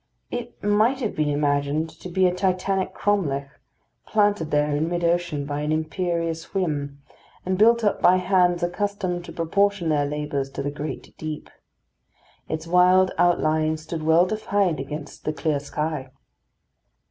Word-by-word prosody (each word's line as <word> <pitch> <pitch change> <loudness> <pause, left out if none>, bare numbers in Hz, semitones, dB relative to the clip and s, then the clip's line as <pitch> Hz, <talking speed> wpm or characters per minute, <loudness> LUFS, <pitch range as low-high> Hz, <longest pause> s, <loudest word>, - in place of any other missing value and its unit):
It 245 0 -6
might 215 +6 +3
have 220 - -2
been 150 -1 +1
imagined 145 +1 0
to 180 - -8
be 185 +2 +2
a 180 - +3
Titanic 185 +1 0
Cromlech, 150 -10 0 0.6
planted 205 -6 +2
there 150 -1 +1
in 155 +3 0
mid 175 0 -2
ocean 170 -4 0
by 145 +1 -3
an 150 +1 -1
imperious 165 +1 -2
whim, 145 -6 -2 0.4
and 185 +1 0
built 230 +4 +4
up 205 - +1
by 180 - +6
hands 180 -1 +2
accustomed 185 -1 -2
to 170 - -9
proportion 175 +2 +1
their 145 -2 +2
labours 145 -2 -3
to 140 - -4
the 145 - -2
great 150 +1 -6
deep. 155 -1 -6 1.0
Its 160 0 -3
wild 180 +2 +5
outline 155 -2 +2
stood 160 +1 -6
well 160 +3 +4
defined 200 -5 0
against 145 +2 -7
the 155 - -1
clear 150 -2 0
sky. 150 -1 -3
165 Hz, 150 wpm, -24 LUFS, 150-185 Hz, 1.0 s, by